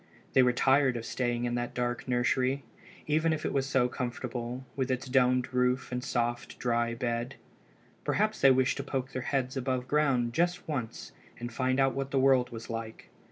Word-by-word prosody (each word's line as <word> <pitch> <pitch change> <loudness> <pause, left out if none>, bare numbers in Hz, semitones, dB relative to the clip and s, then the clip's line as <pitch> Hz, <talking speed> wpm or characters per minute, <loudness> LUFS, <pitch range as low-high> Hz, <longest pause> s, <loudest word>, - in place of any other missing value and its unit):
They 130 - +6
were 125 -1 +5
tired 130 0 +3
of 115 - -6
staying 120 -1 -1
in 120 - -1
that 120 0 -3
dark 120 +1 -2
nursery, 130 +2 +1 0.4
even 155 +2 +2
if 155 -1 -2
it - - -1
was 135 -1 0
so 130 -2 +3
comfortable, 125 0 -4
with 135 -1 -1
its 130 +1 -1
domed 125 -1 +2
roof 125 0 +1
and 125 0 -2
soft, 120 -1 -2
dry 120 -1 0
bed. 120 +2 -2 0.7
Perhaps 215 +1 0
they 135 - +8
wished 130 0 +3
to 140 - -3
poke 135 -1 -3
their 130 - -3
heads 130 0 -1
above 130 -1 -1
ground 130 -6 +2
just 175 +3 0
once 125 -8 -4 0.3
and 120 0 -6
find 130 +1 0
out 135 -1 +3
what 135 0 -3
the 135 - -1
world 130 -2 +4
was 115 -1 -8
like. 115 -1 -6
125 Hz, 190 wpm, -30 LUFS, 120-135 Hz, 0.7 s, they